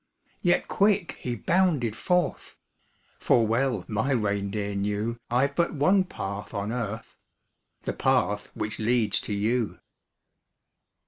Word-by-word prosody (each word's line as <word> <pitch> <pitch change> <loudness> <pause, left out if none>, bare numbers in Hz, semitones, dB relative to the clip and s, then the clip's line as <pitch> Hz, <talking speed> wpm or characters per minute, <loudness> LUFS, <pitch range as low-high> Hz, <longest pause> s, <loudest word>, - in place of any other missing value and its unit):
Yet - - +2
quick 200 -3 +2
he 120 -1 -3
bounded 150 - +1
forth; 180 -1 -1 0.6
For 115 - +3
well 115 -3 0
my 110 +5 -1
reindeer 100 -4 -1
knew 105 +3 -1
I've 135 +4 +1
but 170 -1 +1
one 185 +7 +4
path 100 - -6
on 100 +2 -2
earth 115 -2 -4 0.7
The - - -2
path 105 0 +1
which 105 - -4
leads 110 -1 +2
to 105 - -4
you. 110 +3 0
115 Hz, 120 wpm, -27 LUFS, 105-140 Hz, 0.7 s, one